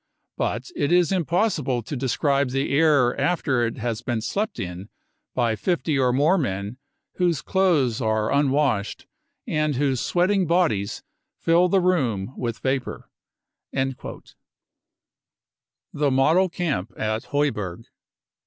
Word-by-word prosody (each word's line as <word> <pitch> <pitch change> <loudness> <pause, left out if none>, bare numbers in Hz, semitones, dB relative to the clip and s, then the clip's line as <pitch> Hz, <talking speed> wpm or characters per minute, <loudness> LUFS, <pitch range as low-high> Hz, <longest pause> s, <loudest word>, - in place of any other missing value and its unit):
But - - -3
it 145 - 0
is 175 -1 +4
impossible 170 - 0
to 145 - -5
describe 140 +1 +1
the 135 +2 -1
air 145 -5 +4
after 140 -6 +1
it 115 - -6
has 115 -1 -3
been 120 -2 -2
slept 205 - -3
in 90 +2 -6 0.5
by 120 -3 +1
50 160 - 0
or 125 -1 +3
more 150 +9 +3
men 100 -3 -3 0.4
whose 175 -5 +1
clothes 155 - +2
are 110 -1 0
unwashed 140 -6 +1 0.4
and 150 -2 0
whose 135 -2 0
sweating 185 +1 +1
bodies 160 - +1 0.3
fill 170 +2 +3
the 195 - +3
room 130 - 0
with 120 -2 -3
vapour." 135 0 -3 0.6
The 135 0 -1 2.2
Model 155 +8 +3
Camp 145 - -2
at 110 +1 -2
Heuberg. 105 -12 -2
135 Hz, 120 wpm, -24 LUFS, 120-170 Hz, 2.2 s, is